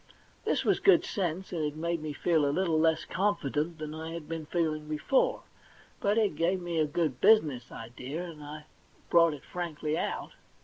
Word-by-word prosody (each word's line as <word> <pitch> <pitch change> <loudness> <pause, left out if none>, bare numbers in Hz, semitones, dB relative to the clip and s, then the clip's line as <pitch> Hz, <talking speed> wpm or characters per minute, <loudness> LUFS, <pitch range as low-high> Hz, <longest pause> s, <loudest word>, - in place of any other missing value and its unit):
This - - +1
was - - +3
good 390 -4 +5
sense, 185 -1 -3
and 165 -3 -1
it 150 0 -2
made 170 +1 -2
me 155 -1 -4
feel 160 +1 +1
a 140 - +2
little 165 +1 +1
less 160 0 +2
confident 170 -5 -1
than 155 -1 -6
I 160 +1 -6
had 165 -3 -7
been 160 -1 -5
feeling 155 -3 -1
before; 155 - +1 0.6
but 205 +2 +1
it 210 -8 +2
gave 175 +4 +1
me 175 -2 -2
a 155 - +3
good 145 -4 -1
business 145 - +4
idea, 125 +8 -6
and 160 -4 -9
I 150 +1 -8 0.5
brought 170 -2 +5
it 140 - -14
frankly 160 -3 -3
out. - - -3
160 Hz, 185 wpm, -30 LUFS, 150-175 Hz, 0.6 s, good